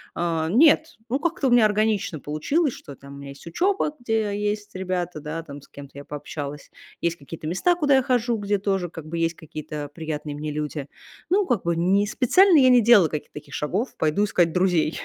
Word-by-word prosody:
Э, 165 Hz, -2 st, -1 dB
нет, 310 Hz, -, +4 dB
ну, 265 Hz, +3 st, 0 dB
как-то 325 Hz, -4 st, -1 dB
у -, -, +3 dB
меня 240 Hz, -3 st, +6 dB
органично 210 Hz, -6 st, 0 dB
получилось, 255 Hz, -, 0 dB
что 140 Hz, -, -11 dB
там 140 Hz, +1 st, -13 dB
у -, -, -10 dB
меня 140 Hz, 0 st, -9 dB
есть 140 Hz, +4 st, -12 dB
учеба, 350 Hz, -, 0 dB
где 220 Hz, -3 st, -1 dB
есть 210 Hz, -1 st, -3 dB
ребята, 180 Hz, -3 st, -3 dB
да, 155 Hz, +2 st, -5 dB
там, 145 Hz, -3 st, -10 dB
с -, -, -18 dB
кем-то 140 Hz, 0 st, -12 dB
я 140 Hz, -, -9 dB
пообщалась, 145 Hz, 0 st, -7 dB, 0.3 s
есть 170 Hz, 0 st, -1 dB
какие-то 155 Hz, +2 st, -9 dB
места, 195 Hz, -, +2 dB
куда 290 Hz, -5 st, +3 dB
я 265 Hz, -, +3 dB
хожу, 240 Hz, -2 st, +1 dB
где 205 Hz, 0 st, 0 dB
тоже 195 Hz, -3 st, -1 dB
как 160 Hz, -2 st, -9 dB
бы 170 Hz, +1 st, -5 dB
есть 165 Hz, 0 st, 0 dB
какие-то 150 Hz, -1 st, -7 dB
приятные 155 Hz, -2 st, -5 dB
мне 150 Hz, 0 st, -4 dB
люди. 150 Hz, -1 st, -4 dB, 0.4 s
Ну, 395 Hz, 0 st, +3 dB
как 235 Hz, -7 st, 0 dB
бы 170 Hz, 0 st, 0 dB
не 190 Hz, +4 st, +2 dB
специально 335 Hz, -, +4 dB
я 255 Hz, -1 st, +6 dB
не 250 Hz, -1 st, +6 dB
делала 210 Hz, -7 st, +6 dB
каких-то 150 Hz, -1 st, -6 dB
таких 150 Hz, -, -10 dB
шагов: 195 Hz, -, -2 dB
пойду 160 Hz, +7 st, +1 dB
искать 175 Hz, -5 st, +1 dB
друзей. 180 Hz, -4 st, +2 dB
180 Hz, 205 wpm, -24 LUFS, 155-235 Hz, 0.4 s, меня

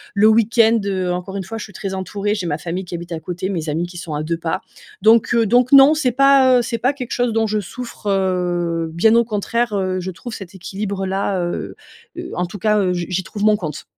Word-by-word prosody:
Le 205 Hz, +2 st, +5 dB
week-end, 225 Hz, +1 st, +4 dB
heu, 185 Hz, -2 st, -1 dB
encore 180 Hz, +2 st, -4 dB
une 195 Hz, -, -3 dB
fois, 225 Hz, +5 st, -7 dB
je 220 Hz, -, -6 dB
suis 205 Hz, -, -15 dB
très 195 Hz, +1 st, -5 dB
entourée, 200 Hz, +2 st, -2 dB
j'ai 185 Hz, -4 st, -3 dB
ma 150 Hz, -, -1 dB
famille 180 Hz, +3 st, -4 dB
qui 175 Hz, -, -6 dB
habite 170 Hz, 0 st, -8 dB
à 165 Hz, -, -3 dB
côté 180 Hz, +3 st, -4 dB
mes 165 Hz, -5 st, -3 dB
amis 165 Hz, +4 st, -1 dB
qui 175 Hz, 0 st, -10 dB
sont 170 Hz, -2 st, -6 dB
à 150 Hz, -, -2 dB
2 165 Hz, +1 st, -2 dB
pas. 170 Hz, +3 st, -3 dB, 0.4 s
Donc, 225 Hz, +3 st, +4 dB
heu, 230 Hz, -1 st, +3 dB
donc 245 Hz, +2 st, +4 dB
non 275 Hz, +2 st, +9 dB
c'est 265 Hz, -5 st, +1 dB
pas, 270 Hz, -1 st, +5 dB
heu, -, -, +2 dB
c'est 230 Hz, 0 st, -3 dB
pas 255 Hz, +4 st, +1 dB
quelque 255 Hz, -4 st, -7 dB
chose 245 Hz, -2 st, 0 dB
dont 225 Hz, 0 st, +2 dB
je 210 Hz, 0 st, 0 dB
souffre, 230 Hz, +3 st, -8 dB
heu, 175 Hz, -3 st, 0 dB
bien 220 Hz, +7 st, +4 dB
au 235 Hz, -, +5 dB
contraire, 225 Hz, +1 st, -1 dB
heu, 185 Hz, -2 st, -1 dB
je 185 Hz, +1 st, -4 dB
trouve 230 Hz, +6 st, -9 dB
cet 195 Hz, -3 st, -9 dB
équilibre 195 Hz, +1 st, -4 dB
là, 190 Hz, 0 st, -1 dB
heu 175 Hz, -, -4 dB, 0.4 s
heu, 350 Hz, -, -6 dB
en 180 Hz, -, -1 dB
tout 180 Hz, -, -8 dB
cas, 210 Hz, +1 st, +2 dB
heu 185 Hz, -2 st, +1 dB
je 175 Hz, -1 st, -2 dB
j'y 185 Hz, 0 st, -1 dB
trouve 205 Hz, +2 st, -6 dB
mon 210 Hz, 0 st, +4 dB
compte. 155 Hz, -6 st, -6 dB
195 Hz, 255 wpm, -19 LUFS, 180-225 Hz, 0.4 s, non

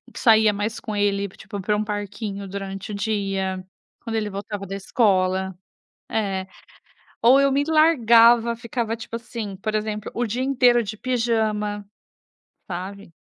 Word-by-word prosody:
saía 220 Hz, -3 st, +5 dB
mais 210 Hz, +3 st, -3 dB
com 215 Hz, -3 st, -5 dB
ele, 200 Hz, -1 st, +1 dB
tipo, 200 Hz, +1 st, -8 dB
para 210 Hz, +2 st, 0 dB
um 210 Hz, -, 0 dB
parquinho 205 Hz, -1 st, -5 dB
durante 195 Hz, +1 st, -6 dB
o -, -, -4 dB
dia 195 Hz, -3 st, -2 dB, 0.4 s
quando 225 Hz, -1 st, -4 dB
ele 210 Hz, -1 st, -1 dB
voltava 200 Hz, 0 st, -6 dB
da 195 Hz, -, -5 dB
escola. 190 Hz, -3 st, +1 dB, 0.5 s
É. 195 Hz, -4 st, -1 dB, 0.8 s
Ou 260 Hz, +4 st, +7 dB
eu 275 Hz, 0 st, +3 dB
me 280 Hz, +1 st, +2 dB
largava 235 Hz, -7 st, +5 dB
ficava, 230 Hz, -1 st, -3 dB
tipo 230 Hz, 0 st, -8 dB
assim, 230 Hz, -4 st, -6 dB
por 215 Hz, +2 st, -3 dB
exemplo, 215 Hz, 0 st, -3 dB
o 240 Hz, 0 st, -1 dB
dia 245 Hz, +5 st, -2 dB
inteiro 245 Hz, -3 st, +4 dB
de 215 Hz, +1 st, -5 dB
pijama, 220 Hz, -4 st, -1 dB, 0.9 s
sabe? 185 Hz, +1 st, -7 dB
210 Hz, 145 wpm, -23 LUFS, 200-230 Hz, 0.9 s, Ou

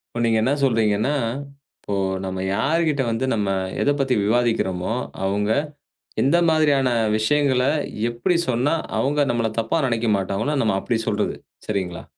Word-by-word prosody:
இப்ப 120 Hz, -, -1 dB
நீங்க 115 Hz, -1 st, +2 dB
என்ன 130 Hz, +5 st, +1 dB
சொல்றீங்கன்னா, 115 Hz, +1 st, +2 dB, 0.4 s
இப்போ 140 Hz, 0 st, -26 dB, 0.6 s
நம்ம 95 Hz, 0 st, -4 dB
யார்கிட்ட 150 Hz, +4 st, +1 dB
வந்து 115 Hz, +4 st, -1 dB
நாம 100 Hz, -3 st, 0 dB, 0.3 s
எதப் 145 Hz, 0 st, +1 dB
பத்தி 135 Hz, -2 st, +2 dB
விவாதிக்கிறோமோ, 110 Hz, -4 st, 0 dB, 0.3 s
அவுங்க 105 Hz, +2 st, 0 dB, 0.7 s
எந்த 150 Hz, +6 st, +3 dB
மாதிரியான 145 Hz, -4 st, +3 dB, 0.3 s
விஷயங்கள, 130 Hz, +2 st, +2 dB, 0.5 s
எப்படி 120 Hz, +9 st, 0 dB
சொன்னா 130 Hz, +6 st, +1 dB, 0.2 s
அவுங்க 145 Hz, +3 st, +1 dB
நம்மள 115 Hz, -2 st, 0 dB
தப்பா 115 Hz, +8 st, 0 dB
நினைக்க 115 Hz, -1 st, 0 dB
மாட்டாங்களோ, 100 Hz, +10 st, -1 dB
நம்ம 110 Hz, -3 st, +1 dB
அப்படி 115 Hz, -2 st, -1 dB
சொல்றது. -, -, -1 dB, 0.3 s
சரிங்களா? 95 Hz, -4 st, -3 dB
120 Hz, 135 wpm, -22 LUFS, 110-140 Hz, 0.7 s, எந்த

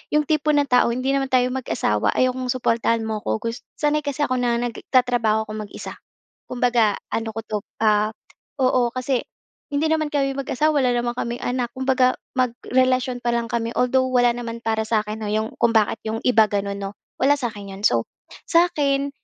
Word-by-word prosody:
'yong 300 Hz, -, +4 dB
tipo 305 Hz, -1 st, +2 dB
ng 290 Hz, -1 st, +2 dB
tao 250 Hz, -1 st, +4 dB
"Hindi 255 Hz, +3 st, -1 dB
naman 270 Hz, -1 st, 0 dB
tayo 250 Hz, -1 st, +3 dB
mag-asawa, 170 Hz, -, 0 dB
ayaw 255 Hz, 0 st, +3 dB
kong 255 Hz, -1 st, -2 dB
suportahan 230 Hz, -2 st, +1 dB
mo 220 Hz, -1 st, -2 dB
ko 110 Hz, -, 0 dB
gus" 230 Hz, +1 st, -3 dB, 0.2 s
sanay 300 Hz, 0 st, +2 dB
kasi 285 Hz, +1 st, -1 dB
ako 255 Hz, -2 st, -1 dB
na 240 Hz, -1 st, +1 dB
nagtatrabaho 240 Hz, -2 st, +1 dB
ako -, -, -7 dB, 0.2 s
mag-isa. -, -, -8 dB, 0.6 s
Kumbaga, 240 Hz, -4 st, +2 dB, 0.2 s
ano 225 Hz, 0 st, -1 dB
ko 225 Hz, -, -3 dB
'to, 210 Hz, -, -2 dB, 0.3 s
ah, 210 Hz, 0 st, +3 dB, 0.5 s
oo, 255 Hz, -2 st, +3 dB
kasi 255 Hz, 0 st, 0 dB, 0.5 s
hindi 295 Hz, +2 st, 0 dB
naman 315 Hz, -1 st, +1 dB
kami 275 Hz, -1 st, +2 dB
mag-asawa, 295 Hz, +3 st, +1 dB
wala 250 Hz, -, +3 dB
naman 240 Hz, 0 st, 0 dB
kaming 240 Hz, +1 st, -3 dB
anak. 245 Hz, -1 st, -1 dB
Kumbaga, 260 Hz, -1 st, +2 dB, 0.2 s
magkarelasyon 255 Hz, +1 st, +1 dB
pa 240 Hz, 0 st, 0 dB
lang 235 Hz, -1 st, -2 dB
kami. 230 Hz, 0 st, -2 dB
Although 260 Hz, +1 st, +2 dB
wala 245 Hz, -1 st, +4 dB
naman 235 Hz, -1 st, -6 dB
para 220 Hz, -1 st, 0 dB
sa 220 Hz, -1 st, +2 dB
akin 215 Hz, +1 st, -6 dB
'no, -, -, -3 dB
'yong 220 Hz, +1 st, -1 dB
kung 235 Hz, -, +4 dB
bakit 215 Hz, 0 st, +2 dB
'yong 220 Hz, +1 st, -2 dB
iba 225 Hz, -3 st, +5 dB
gano'n 200 Hz, -1 st, -2 dB
'no? 195 Hz, 0 st, -5 dB, 0.3 s
Wala 275 Hz, +2 st, +5 dB
sa'kin 205 Hz, -6 st, -5 dB
'yon. 195 Hz, -, -10 dB
So, -, -, +2 dB, 0.4 s
sa'kin 285 Hz, -5 st, +2 dB
245 Hz, 185 wpm, -22 LUFS, 225-260 Hz, 0.6 s, iba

